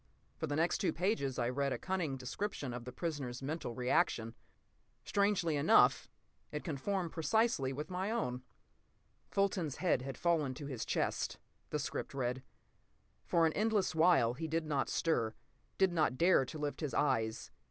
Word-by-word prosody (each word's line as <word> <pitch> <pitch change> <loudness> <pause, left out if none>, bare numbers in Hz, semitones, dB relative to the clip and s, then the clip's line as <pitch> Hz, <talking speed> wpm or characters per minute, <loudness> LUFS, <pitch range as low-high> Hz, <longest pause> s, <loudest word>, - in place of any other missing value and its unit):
For 160 - -3
the 145 - -1
next 165 +3 +1
two 190 - +1
pages 160 - 0
I 120 - +1
read 140 +2 0
a - - -1
cunning 175 -7 -2
description 135 +1 -4
of 120 -1 -6
the 125 - -6
prisoner's 135 -4 -4
mental 145 -4 -3
reaction. 115 -2 +1 0.7
Strangely 200 -6 +2
enough, 140 - +5 0.4
it 150 - -4
conformed 175 +4 -2
precisely 170 - +1
with 150 +6 -5
my 185 +3 -1
own. 130 - -1 0.9
"Fulton's 190 -7 0
head 175 -8 +1
had 135 0 -6
fallen 155 -6 +1
to 145 - -7
his 130 -5 -4
chest," - - -1 0.3
the 150 - -1
script 145 0 -4
read. 125 -1 -1 0.9
"For 165 -1 +4
an 160 - +2
endless 215 -2 +1
while 160 -8 +4
he 160 +6 -4
did 160 +1 -1
not 145 -3 0
stir, 115 -9 0 0.4
did 190 -2 +3
not 155 -6 +2
dare 170 -4 +5
to 155 - -7
lift 150 +1 -3
his 150 -4 -2
eyes. 115 -6 0
150 Hz, 165 wpm, -34 LUFS, 130-175 Hz, 0.9 s, enough